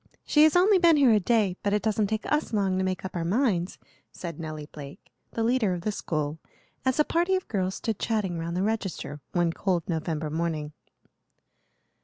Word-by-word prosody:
She 300 - +4
has 315 - +3
only 380 +2 +5
been 335 -3 +5
here 270 -4 +5
a 215 - +5
day, 205 -3 +1
but 205 - 0
it 210 -2 +1
doesn't 215 -1 +1
take 220 +2 -2
us 300 -5 0
long 195 -3 +1
to - - +1
make 185 0 -2
up 190 - -6
our 170 - -1
minds," 185 -2 0 0.3
said 170 -3 -7
Nelly 155 -2 -6
Blake, 145 -1 -11 0.2
the 225 - -1
leader 225 -5 +2
of 175 - -6
the 215 - -1
school, 155 -5 -3 0.4
as 260 +2 0
a - - +7
party 350 +3 +1
of 370 - -3
girls 190 -3 -1
stood 220 -3 -3
chatting 200 -7 -1
round 170 +1 -3
the 185 - +1
register 195 -9 -3
one 170 -1 +1
cold 180 -3 0
November 160 -2 -2
morning. 155 -2 -2
190 Hz, 200 wpm, -27 LUFS, 170-225 Hz, 0.4 s, a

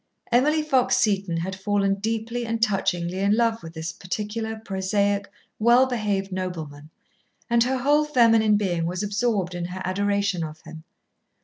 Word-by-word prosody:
Emily 300 +6 +3
Fox 265 -5 +2
Seton 195 -5 +1
had 185 +3 -3
fallen 195 0 +1
deeply 225 +3 -2
and 230 0 -2
touchingly 190 -4 0
in 200 +2 +2
love 230 -1 +1
with 165 0 -10
this 160 +1 -4
particular 215 +5 -4
prosaic, 200 0 -1 0.3
well 240 +4 +5
behaved 205 -6 -2
nobleman, 160 -6 -5 0.6
and 235 0 +5
her 260 +1 0
whole 290 +4 +3
feminine 225 -6 +4
being 175 -5 -1
was 180 +3 -3
absorbed 205 -3 -1
in 175 -1 -4
her 180 +1 -6
adoration 200 -1 0
of 155 0 -7
him. 160 0 -11
200 Hz, 150 wpm, -24 LUFS, 185-230 Hz, 0.6 s, well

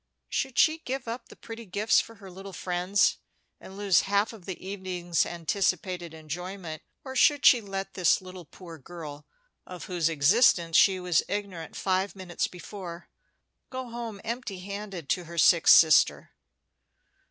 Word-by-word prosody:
Should 265 -2 -2
she 315 0 +4
give 265 -4 -5
up 230 +2 -6
the - - -13
pretty 225 -1 -10
gifts 205 +4 +2
for 230 - -13
her 195 -2 -12
little 195 +2 -10
friends, 180 +3 +1 0.4
and 190 - -12
lose 200 -4 +3
half 200 +3 +1
of 205 -6 -13
the 190 - -6
evening's 185 -3 -2
anticipated 180 0 -2
enjoyment, 165 +1 -7 0.2
or 265 -1 -8
should 285 +2 +4
she 245 - +7
let 195 -1 -5
this 180 -4 +3 0.3
poor 170 -4 -11
girl 150 -1 -10 0.4
of 180 -1 -8
whose 175 -3 0
existence 165 - +3
she 190 0 +5
was 180 -2 +2
ignorant 195 -5 -5
five 190 +1 -1
minutes 185 -3 -3
before 180 -2 -9 0.6
go 255 -2 -6
home 230 -3 -6
empty 230 -5 -5
handed 200 -4 -7
to 180 - 0
her 170 +1 -10
sick 170 0 +5
sister? 160 -2 +6
190 Hz, 150 wpm, -27 LUFS, 175-205 Hz, 0.6 s, she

